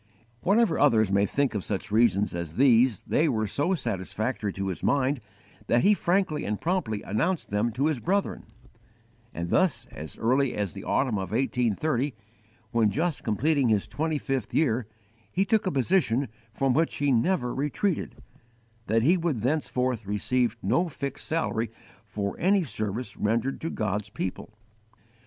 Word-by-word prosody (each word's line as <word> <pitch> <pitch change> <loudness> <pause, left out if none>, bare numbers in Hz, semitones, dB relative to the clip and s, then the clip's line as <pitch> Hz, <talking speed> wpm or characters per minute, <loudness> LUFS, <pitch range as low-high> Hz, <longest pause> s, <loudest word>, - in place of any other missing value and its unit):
Whatever 205 -2 +3
others 110 -8 +4
may 100 +1 +3
think 140 +2 0
of 105 -4 -2
such 100 0 -4
reasons 105 -2 +3
as 85 -2 -5
these, 125 -3 +4
they 155 +1 +2
were 110 -4 0
so 145 - +1
satisfactory 110 - -2
to 95 0 -3
his 95 - -4
mind 140 -1 +1 0.5
that 120 +1 +3
he 210 - +6
frankly 185 -5 +1
and 105 0 -2
promptly 160 - -1
announced 150 - -1
them 105 +3 +1
to 135 +5 0
his 155 -5 +1
brethren; 195 +8 -1 0.9
and 85 +1 -5
thus, 185 -5 +2
as 75 0 -8
early 130 +3 +1
as 100 -5 -2
the - - -8
autumn 120 -7 +1
of 95 -2 -4
1830, 125 - 0 0.6
when 115 -2 +3
just 160 +5 -1
completing 135 +4 +1
his 105 -3 +2
twenty 160 0 -1
fifth 135 -6 -3
year, 120 -7 +2 0.4
he 190 +2 +1
took 220 -1 +2
a - - +1
position 135 - +1 0.2
from 135 +3 +1
which 160 +5 +1
he 145 -1 +1
never 125 0 +1
retreated, 150 +6 -2 0.6
that 115 +2 +2
he 170 +8 +4
would 165 -10 -1
thenceforth 125 -3 0
_receive 115 +3 0
no 130 - +2
fixed 140 -2 -5
salary 120 -8 -1 0.4
for 100 -1 -3
any 190 +1 +3
service 110 - -4
rendered 115 +5 0
to 165 - -2
God's 105 - -2
people. 100 -1 -5
125 Hz, 155 wpm, -27 LUFS, 105-155 Hz, 0.9 s, he